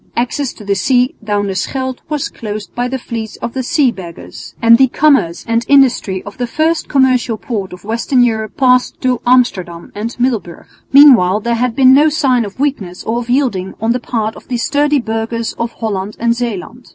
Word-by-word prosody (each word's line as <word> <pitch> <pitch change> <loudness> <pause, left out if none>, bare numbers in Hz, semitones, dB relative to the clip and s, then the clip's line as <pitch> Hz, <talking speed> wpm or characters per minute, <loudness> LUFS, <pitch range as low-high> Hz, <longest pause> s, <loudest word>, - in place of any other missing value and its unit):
Access 250 +3 -1
to 210 - -13
the 200 - +1
sea 250 +5 +1
down 205 -1 -1
the 195 - -2
Scheldt 260 +7 -3
was 300 -2 -2
closed 210 -2 -7
by 245 +1 -2
the 265 +1 -3
fleets 225 -3 -6
of 235 - -6
the 265 - -2
Sea 260 +1 +2
Beggars, 170 - -10
and 230 0 +5
the 265 - +6
commerce 270 - +1
and 230 0 +1
industry 250 -9 +3
of 205 +4 -11
the 245 - -1
first 315 +6 -1
commercial 255 -4 +2
port 205 -5 -4
of 180 0 -11
western 230 +4 +1
Europe 220 -2 -2
passed 255 -2 +2
to 255 -2 0
Amsterdam 185 -9 +1
and 225 +4 -6
Middelburg. 230 -9 -2 0.3
Meanwhile 240 -9 +6
there 235 +2 -1
had 235 0 -1
been 260 -1 +6
no 295 +3 +5
signs 255 -6 +1
of 200 - -13
weakness 220 -11 -2
or 230 +2 -1
of 240 0 -7
yielding 240 -8 0
on 225 +2 0
the 250 - 0
part 220 -2 -3
of - - -14
the 250 - -2
sturdy 285 +4 +1
burghers 225 0 -3
of 235 0 -2
Holland 205 -2 -4
and 235 0 +1
Zeeland. 235 0 -5
235 Hz, 200 wpm, -15 LUFS, 210-260 Hz, 0.3 s, the